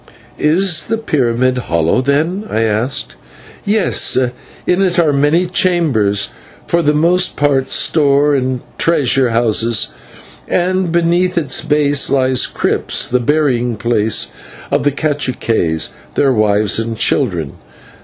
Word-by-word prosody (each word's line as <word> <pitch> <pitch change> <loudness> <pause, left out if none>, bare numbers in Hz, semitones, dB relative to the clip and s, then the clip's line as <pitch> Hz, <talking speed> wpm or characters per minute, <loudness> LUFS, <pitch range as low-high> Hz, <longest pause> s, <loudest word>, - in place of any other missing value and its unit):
"Is 170 +2 +2
the 225 - -1
pyramid 130 - 0
hollow, 85 0 0
then?" 155 +9 -1
I 110 - -1
asked. 110 +4 -2 0.5
"Yes, 205 -1 +1 0.5
in 180 +2 +1
it 185 -3 0
are 160 -4 +3
many 145 +6 +2
chambers, 155 - +1 0.4
for 170 - +1
the 150 -1 +1
most 175 +4 +1
part 140 -2 0
store 145 -1 +2
and 130 -2 -1 0.2
treasure 135 -5 +2
houses, 115 -1 +1 0.6
and 185 0 0
beneath 175 +2 +1
its 145 -5 0
base 145 -2 +2
lie 130 -1 +1 0.2
crypts, - - -1
the 125 - +1
burying 125 -4 0
place 110 -1 0 0.4
of - - +1
the 145 - +3
/caciques/, 125 - -1 0.3
their 135 -2 +2
wives, 105 -1 +1
and 115 0 -4
children. 80 -10 0
140 Hz, 125 wpm, -15 LUFS, 115-170 Hz, 0.6 s, are